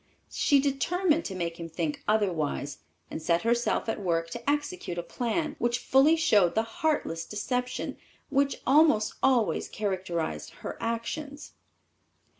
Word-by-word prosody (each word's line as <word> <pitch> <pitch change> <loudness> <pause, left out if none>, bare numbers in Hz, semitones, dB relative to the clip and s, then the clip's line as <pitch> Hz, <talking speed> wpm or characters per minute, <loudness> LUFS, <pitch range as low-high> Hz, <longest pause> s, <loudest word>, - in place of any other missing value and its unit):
She 285 - +3
determined 310 +5 +1
to 190 - -4
make 170 -2 -3
him 165 0 -6
think 160 -2 -3
otherwise, 170 -9 0 0.3
and - - -5
set 170 +1 +1
herself 235 +1 +1
at 225 - -2
work 165 -3 -1
to 235 +6 -3
execute 290 - -2
a 175 - -2
plan, 285 - -2
which 240 0 +1
fully 270 +6 +4
showed 210 - +3
the 220 - +3
heartless 225 - -1
deception 250 +5 -3 0.3
which 280 0 +1
almost 270 -6 +4
always 250 -5 +2
characterized 180 - -3
her - - -4
actions. 275 +6 -4
230 Hz, 135 wpm, -28 LUFS, 175-280 Hz, 0.3 s, fully